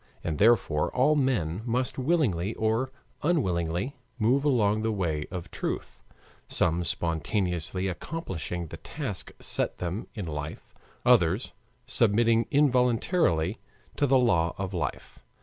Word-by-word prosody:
And 80 Hz, -3 st, -2 dB
therefore 105 Hz, -9 st, +4 dB
all 140 Hz, +5 st, +4 dB
men 110 Hz, -, 0 dB
must 125 Hz, +1 st, -1 dB
willingly 125 Hz, -, +1 dB
or 115 Hz, +4 st, 0 dB, 0.3 s
unwillingly 95 Hz, -, 0 dB, 0.2 s
move 125 Hz, +4 st, +2 dB
along 110 Hz, -7 st, +2 dB
the 110 Hz, 0 st, 0 dB
way 80 Hz, -7 st, -1 dB
of 90 Hz, -2 st, -6 dB
truth, -, -, -4 dB, 0.4 s
some 85 Hz, +1 st, +1 dB
spontaneously 85 Hz, +2 st, -1 dB
accomplishing 90 Hz, -, -4 dB
the 85 Hz, -, -7 dB
task 115 Hz, -, -6 dB
set -, -, -1 dB
them 90 Hz, +5 st, -4 dB
in 105 Hz, -4 st, -4 dB
life, 75 Hz, -1 st, -6 dB, 0.3 s
others -, -, +3 dB, 0.3 s
submitting 115 Hz, +1 st, +3 dB
involuntarily 125 Hz, -, +2 dB, 0.4 s
to 145 Hz, -, +3 dB
the 135 Hz, 0 st, +5 dB
law 85 Hz, -10 st, +2 dB
of 95 Hz, 0 st, -4 dB
life. 85 Hz, -, -4 dB
105 Hz, 120 wpm, -28 LUFS, 85-125 Hz, 0.4 s, the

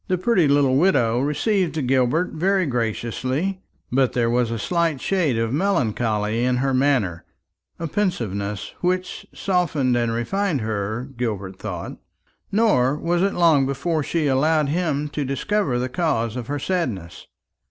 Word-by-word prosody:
The 185 Hz, -, +1 dB
pretty 185 Hz, -4 st, +2 dB
little 140 Hz, -2 st, +3 dB
widow 130 Hz, -9 st, +3 dB
received 155 Hz, -, 0 dB
Gilbert 130 Hz, +7 st, +2 dB
very 190 Hz, +3 st, +1 dB
graciously; 130 Hz, -, -2 dB, 0.3 s
but 130 Hz, 0 st, +2 dB
there 115 Hz, -2 st, +1 dB
was 120 Hz, -1 st, +1 dB
a 115 Hz, -, -2 dB
slight 165 Hz, +3 st, 0 dB
shade 165 Hz, -7 st, 0 dB
of 115 Hz, +1 st, -1 dB
melancholy 115 Hz, -, 0 dB
in 125 Hz, 0 st, +2 dB
her 135 Hz, +1 st, 0 dB
manner, 130 Hz, -11 st, +1 dB, 0.5 s
a 165 Hz, -, -4 dB
pensiveness 105 Hz, -, -2 dB
which 185 Hz, +1 st, -2 dB
softened 160 Hz, -9 st, 0 dB
and 120 Hz, -1 st, +1 dB
refined 145 Hz, -, -1 dB
her, 110 Hz, +3 st, -3 dB
Gilbert 100 Hz, -6 st, -3 dB
thought. -, -, -6 dB, 0.5 s
Nor 195 Hz, -, +3 dB
was 170 Hz, +2 st, 0 dB
it 195 Hz, +1 st, +1 dB
long 160 Hz, -6 st, +4 dB
before 155 Hz, +4 st, -1 dB
she 160 Hz, +2 st, -1 dB
allowed 150 Hz, +2 st, +2 dB
him 150 Hz, -3 st, 0 dB
to 145 Hz, 0 st, -3 dB
discover 140 Hz, -, 0 dB
the 125 Hz, +1 st, -1 dB
cause 125 Hz, -5 st, -1 dB
of 120 Hz, -2 st, -5 dB
her 145 Hz, -, -2 dB
sadness. 125 Hz, -, -3 dB
135 Hz, 145 wpm, -22 LUFS, 120-170 Hz, 0.5 s, long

